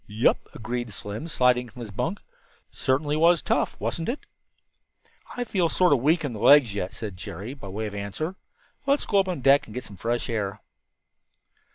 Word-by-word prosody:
"Yep," 105 Hz, +3 st, +1 dB
agreed 120 Hz, 0 st, -4 dB
Slim, 105 Hz, +8 st, -6 dB
sliding 125 Hz, -5 st, +2 dB
from 125 Hz, +2 st, -11 dB
his 110 Hz, -3 st, -7 dB
bunk. 165 Hz, -, -2 dB, 0.5 s
"Certainly 145 Hz, +3 st, 0 dB
was 170 Hz, +1 st, +4 dB
tough, -, -, 0 dB
wasn't 165 Hz, -1 st, -2 dB
it?" 265 Hz, -, -3 dB, 1.2 s
"I 245 Hz, -, 0 dB
feel 185 Hz, -7 st, +1 dB
sort 180 Hz, -2 st, +4 dB
of 140 Hz, -, +3 dB
weak 155 Hz, +5 st, +2 dB
in 135 Hz, -, -3 dB
the 110 Hz, -, -6 dB
legs 140 Hz, -6 st, +6 dB
yet," 95 Hz, -2 st, -3 dB
said 105 Hz, -4 st, -6 dB
Jerry, 100 Hz, +7 st, -6 dB
by 135 Hz, -8 st, -10 dB
way 105 Hz, +3 st, -4 dB
of 105 Hz, -, -5 dB
answer. 100 Hz, -, -4 dB, 0.5 s
"Let's 280 Hz, +1 st, +3 dB
go 200 Hz, -, +3 dB
up 190 Hz, -, +2 dB
on 180 Hz, -7 st, -3 dB
deck 140 Hz, +2 st, +5 dB
and 105 Hz, -, -11 dB
get 125 Hz, -, -4 dB
some 100 Hz, -, -10 dB
fresh 120 Hz, +3 st, -1 dB
air." 105 Hz, -5 st, -2 dB
125 Hz, 190 wpm, -26 LUFS, 105-160 Hz, 1.2 s, legs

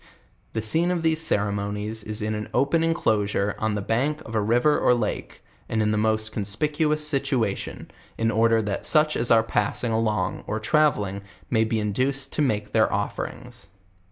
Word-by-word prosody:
The 110 Hz, -, -2 dB
scene 165 Hz, +11 st, +3 dB
of 175 Hz, -2 st, -1 dB
these 160 Hz, -1 st, +2 dB
ceremonies 105 Hz, -3 st, -1 dB
is 105 Hz, 0 st, -4 dB
in 110 Hz, 0 st, -1 dB
an 105 Hz, 0 st, -5 dB
open 155 Hz, +4 st, +2 dB
enclosure 105 Hz, -11 st, 0 dB
on 110 Hz, -1 st, 0 dB
the 100 Hz, -, -3 dB
bank 135 Hz, +8 st, 0 dB
of 115 Hz, -, -10 dB
a 110 Hz, -, +1 dB
river 120 Hz, +8 st, +2 dB
or 125 Hz, -, +4 dB
lake, 110 Hz, -3 st, -4 dB, 0.3 s
and 110 Hz, -, -1 dB
in 105 Hz, -1 st, +2 dB
the -, -, +1 dB
most 110 Hz, 0 st, 0 dB
conspicuous 150 Hz, -, 0 dB
situation, 135 Hz, -8 st, -2 dB, 0.3 s
in 115 Hz, 0 st, +1 dB
order 115 Hz, 0 st, +3 dB
that 100 Hz, -1 st, -3 dB
such 155 Hz, -1 st, +3 dB
as 115 Hz, -, +1 dB
are 115 Hz, -1 st, +5 dB
passing 115 Hz, +2 st, -1 dB
along 105 Hz, -4 st, -1 dB
or 110 Hz, -, -2 dB
travelling, 105 Hz, -7 st, +1 dB, 0.3 s
may 110 Hz, -2 st, +3 dB
be 110 Hz, 0 st, -1 dB
induced 130 Hz, +6 st, -1 dB
to -, -, -1 dB
make 105 Hz, -7 st, 0 dB
their 110 Hz, -1 st, +3 dB
oiferings. 100 Hz, -4 st, -5 dB
110 Hz, 175 wpm, -24 LUFS, 105-140 Hz, 0.3 s, are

